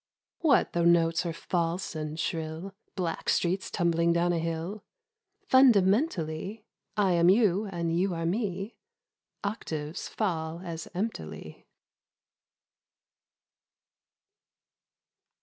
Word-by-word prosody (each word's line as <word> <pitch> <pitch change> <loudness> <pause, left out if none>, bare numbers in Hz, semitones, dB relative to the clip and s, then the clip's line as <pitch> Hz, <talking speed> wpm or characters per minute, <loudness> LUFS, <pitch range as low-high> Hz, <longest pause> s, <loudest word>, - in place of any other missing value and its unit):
What 310 -5 +3
though 170 - +1
notes 170 0 +3
are - - -1
false 170 +1 -2
and 155 0 -4
shrill 160 +4 -3 0.2
Black 175 -4 -2
streets 185 +2 +1
tumbling 170 -2 +2
down 170 +1 +2
a 170 - 0
hill? 165 +5 -3 0.6
Fundamentally 210 - +3 0.3
I 200 -3 +3
am 170 0 +4
you 205 0 +3
and 170 -3 -2
you 180 +1 +1
are 165 0 -2
me 195 +2 -2 0.3
— - - -54
Octaves 160 -6 -4
fall 165 -5 -2
as 165 -2 -6
emptily. 185 - -5
175 Hz, 100 wpm, -28 LUFS, 165-195 Hz, 0.6 s, am